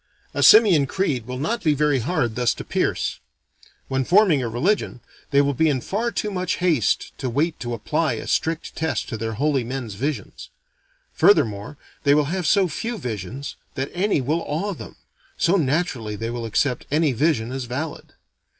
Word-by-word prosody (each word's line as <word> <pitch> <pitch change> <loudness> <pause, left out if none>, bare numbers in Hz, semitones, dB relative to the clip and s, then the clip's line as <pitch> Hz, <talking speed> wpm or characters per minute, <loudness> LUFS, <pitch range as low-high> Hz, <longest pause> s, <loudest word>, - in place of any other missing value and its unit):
A - - -1
simian 195 -11 +7
creed 135 - -1
will 125 0 -4
not 220 - -2
be 155 -3 +3
very 145 -2 +2
hard 120 -3 0
thus 120 -1 +1
to - - -7
pierce. - - -1 0.7
When 135 0 0
forming 180 - +4
a 120 - -2
religion, 135 - 0 0.3
they 140 0 +4
will 140 0 +1
be 160 +5 +2
in 135 -3 +1
far 215 - -2
too 210 -2 -3
much 185 -2 -1
haste, 165 - +1
to 130 - -2
wait 155 +7 0
to 120 -1 -3
apply 110 - 0
a - - -5
strict 165 0 -1
test 160 0 -2
to 120 - -4
their 110 +1 -3
holy 140 +2 +1
men's 120 -3 -5
visions. 140 - -4 0.6
Furthermore 110 - +2 0.3
they 145 0 +5
will 150 -1 +3
have 185 -4 -1
so 195 +1 +4
few 230 +7 -4
visions, 125 - -5 0.2
that 135 +1 -3
any 185 -4 +1
will 155 +6 0
awe 185 +8 -2
them; - - -10 0.4
so 170 +3 +3
naturally 140 - 0
they 115 +2 -4
will 120 -1 -4
accept 125 +4 0
any 155 0 +2
vision 125 -2 +1
as 130 -1 -4
valid. 140 +6 -5
145 Hz, 180 wpm, -23 LUFS, 125-170 Hz, 0.7 s, simian